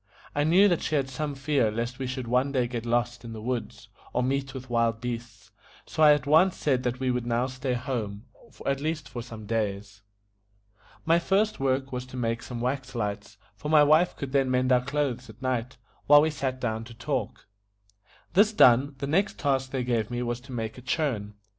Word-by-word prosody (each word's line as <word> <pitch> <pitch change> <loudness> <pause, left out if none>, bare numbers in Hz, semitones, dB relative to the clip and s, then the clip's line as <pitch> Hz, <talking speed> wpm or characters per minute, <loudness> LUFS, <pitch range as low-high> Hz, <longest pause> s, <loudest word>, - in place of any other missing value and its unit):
I 145 - +1
knew 185 +6 +6
that 175 -4 +1
she 155 - -1
had 135 -2 0
some 145 +2 -3
fear 135 -4 +1
lest 120 +3 -4
we 130 - -2
should 130 0 -4
one 125 +3 +2
day 130 -3 +1
get 120 -1 -5
lost 120 0 0
in 115 -1 -7
the 110 - -7
woods, 120 +1 -4 0.3
or 125 - +1
meet 135 +1 -1
with 130 0 -7
wild 115 -2 +1
beasts, 120 -2 -6 0.3
so - - -4
I 150 -1 +8
at 145 -1 -1
once 160 +6 +4
said 130 -4 +1
that 125 0 -2
we 130 -1 +1
would 125 -1 -2
now 120 +1 +1
stay 130 0 -3
at 120 - -4
home, 110 -6 -4 0.4
at 135 0 0
least 155 0 -2
for 120 - -6
some 115 -2 -9
days. 105 -2 -3 1.0
My 165 +1 +4
first 205 +5 +1
work 135 0 0
was 125 0 -4
to 130 - -9
make 115 -1 -1
some 120 -2 -6
wax 130 +1 -3
lights, 105 -2 -4 0.2
for 150 +8 -6
my 155 -1 +6
wife 155 +4 +4
could 140 -2 -5
then 135 -2 +2
mend 130 0 +1
our 125 -1 +4
clothes 135 -3 -2
at 110 - -13
night, 130 -1 -2 0.3
while 145 0 +8
we 160 - +1
sat 135 -3 -3
down 110 -3 -2
to 115 0 -12
talk. 120 -2 -3 0.9
This 205 +4 +5
done, 135 - +5
the 140 - -3
next 190 +8 +1
task 135 -2 0
they 130 -1 -2
gave 115 -3 0
me 120 0 -2
was 120 0 -2
to 130 +2 -14
make 115 -1 -4
a - - -12
churn. 125 -6 -2
130 Hz, 215 wpm, -27 LUFS, 120-140 Hz, 1.0 s, I